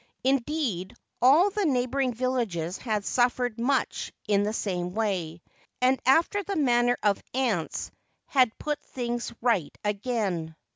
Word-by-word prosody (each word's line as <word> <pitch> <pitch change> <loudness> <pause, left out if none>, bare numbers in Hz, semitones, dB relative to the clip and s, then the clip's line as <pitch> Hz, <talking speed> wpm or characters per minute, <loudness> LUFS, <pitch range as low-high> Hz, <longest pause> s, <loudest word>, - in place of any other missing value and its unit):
Indeed, 260 - 0 0.3
all 310 +11 +6
the 415 +1 -1
neighbouring 260 -3 +1
villages 225 -9 -2
had 215 -4 -2
suffered 245 -1 +1
much 260 +3 0 0.2
in 200 -1 +3
the 205 +1 0
same 180 -4 -3
way, 180 -7 -2 0.4
and 255 +1 +3
after 330 +9 +4
the 395 0 -4
manner 245 -5 +3
of 205 -2 +2
ants 230 -11 -1 0.3
had 255 -5 +2
put 295 -1 -3
things 240 -1 -4
right 215 -11 +1
again. 200 -7 -1
240 Hz, 130 wpm, -27 LUFS, 200-265 Hz, 0.4 s, all